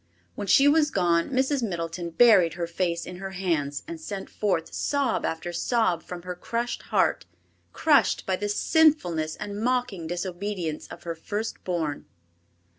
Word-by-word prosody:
When 205 - -5
she 275 +8 +6
was 300 +1 +4
gone 170 - +2
Mrs. 265 +1 +1
Middleton 170 -4 -3
buried 180 -4 +5
her 170 -1 -2
face 170 0 -2
in 180 - -8
her 190 +1 -6
hands, 155 -7 -1
and 330 -1 -7
sent 200 -10 -6
forth 185 -6 -1
sob 280 -5 0
after 165 +2 -3
sob 180 -2 +1
from 175 0 -8
her 180 0 -4
crushed 235 +7 -3
heart—crushed 305 -3 +1
by 190 - +1
the 205 +2 -3
sinfulness 205 - +2
and 205 0 -6
mocking 240 -8 -1
disobedience 175 -1 -4
of - - -11
her 170 - -3
first 205 +7 -5
born. 160 -5 -2
185 Hz, 150 wpm, -26 LUFS, 170-235 Hz, -, she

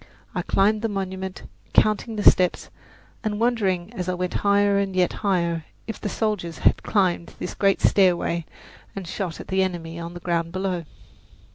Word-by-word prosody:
I - - -1
climbed 210 +2 +2
the 225 - 0
monument, 190 -1 -4 0.3
counting 215 +1 +2
the 210 - -2
steps, 180 -1 +4 0.5
and 210 -2 -1
wondering 210 -5 +1
as 185 -5 -3
I 180 - 0
went 180 0 -2
higher 200 0 +3
and 195 -1 -2
yet 180 -1 +2
higher 170 -5 0 0.2
if 225 - -6
the 205 - -2
soldiers 200 -8 -2
had - - +3
climbed 180 -5 0
this - - -5
great 195 -1 +2
stairway 175 -3 +3 0.5
and 195 -3 -6
shot 180 -2 -4
at - - -9
the 190 0 +2
enemy 170 -3 -3
on 170 +1 -6
the - - -6
ground 170 -1 -1
below. 185 -3 -2
190 Hz, 170 wpm, -24 LUFS, 175-205 Hz, 0.5 s, steps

